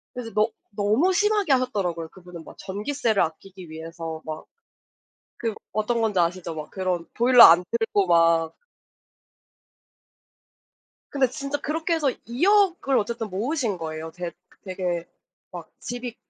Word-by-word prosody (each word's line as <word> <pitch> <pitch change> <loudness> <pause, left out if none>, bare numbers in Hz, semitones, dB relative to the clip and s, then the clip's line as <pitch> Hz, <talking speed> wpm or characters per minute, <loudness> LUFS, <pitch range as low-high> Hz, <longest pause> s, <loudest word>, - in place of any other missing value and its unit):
그래서 245 -2 -6
너 215 +1 +2 0.3
너무 215 - +2
심하게 415 -4 +2
하셨더라고요. 195 -11 0
그분은 180 -2 -12
막 - - -13
전기세를 215 +3 -1
아끼기 180 +2 -6
위해서 165 0 -7
막 155 0 -6 0.9
그 225 -2 -2 0.2
어떤 225 +2 0
건지 215 -4 +1
아시죠? 170 -1 0
막 155 -1 -7
그런 185 -3 -2
보일러 245 0 +7
안 170 +2 +8
틀고 225 -4 +1
막 165 -1 +3 2.5
근데 275 -2 +2
진짜 280 +2 -4
그렇게 320 +4 -1
해서 300 -4 +1 0.2
2 245 +9 0
억을 385 -9 +3
어쨌든 225 +1 -3
모으신 225 - -1
거예요. 160 0 -5
됐 175 0 -6 0.3
되게 180 -3 -3 0.4
막 - - -9
집이 245 -1 -6
205 Hz, 275 characters per minute, -24 LUFS, 170-255 Hz, 2.5 s, 안